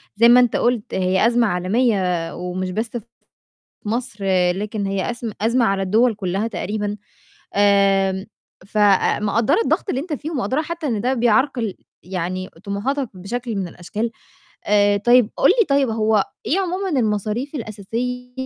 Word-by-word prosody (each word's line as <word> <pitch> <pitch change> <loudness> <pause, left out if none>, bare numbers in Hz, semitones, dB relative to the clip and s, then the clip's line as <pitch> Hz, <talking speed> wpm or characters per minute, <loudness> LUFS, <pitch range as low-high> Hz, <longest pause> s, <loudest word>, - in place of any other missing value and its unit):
زي 230 +3 +6
ما 245 +1 +8
أنت 245 -2 +3
قُلت 240 -3 0
هي 190 +3 +2
أزمة 235 -1 +3
عالمية 185 -3 0
ومش 180 +1 -4
بس 220 +5 -2
في 230 - -9 0.8
مصر، 220 -2 -3 0.3
لكن 205 +2 -3
هي 195 +1 -2
أزم 235 -2 -5
أزمة 235 +2 +2
على 195 -2 +1
الدوَل 220 +5 +2
كلّها 195 +2 -2
تقريبًا، 205 0 -3 0.6
آمم 195 -1 +3 0.4
فمقدّرة 210 - +2
الضغط - - 0
اللي 265 - -1
أنت 320 +1 -5
فيه 300 +3 -5
ومقدّرة 260 0 -1
حتّى 325 -1 -4
إن 220 -5 -1
ده 255 +4 +1
بيعرقل 240 -3 +1 0.3
يعني 185 0 -4
طموحاتك 235 +6 -2
بشكل 230 +5 -5
من 190 -3 -2
الأشكال، 210 +7 -4 0.6
آآ 205 0 +4
طيب 240 +2 +4
قُل - - +4
لي - - +5
طيب 275 -2 +3
هو 215 -2 +2 0.2
إيه 345 - +1
عمومًا 380 +1 -2
المصاريف 215 +6 -2
الأساسية 245 +2 -4
215 Hz, 145 wpm, -21 LUFS, 195-245 Hz, 0.8 s, ما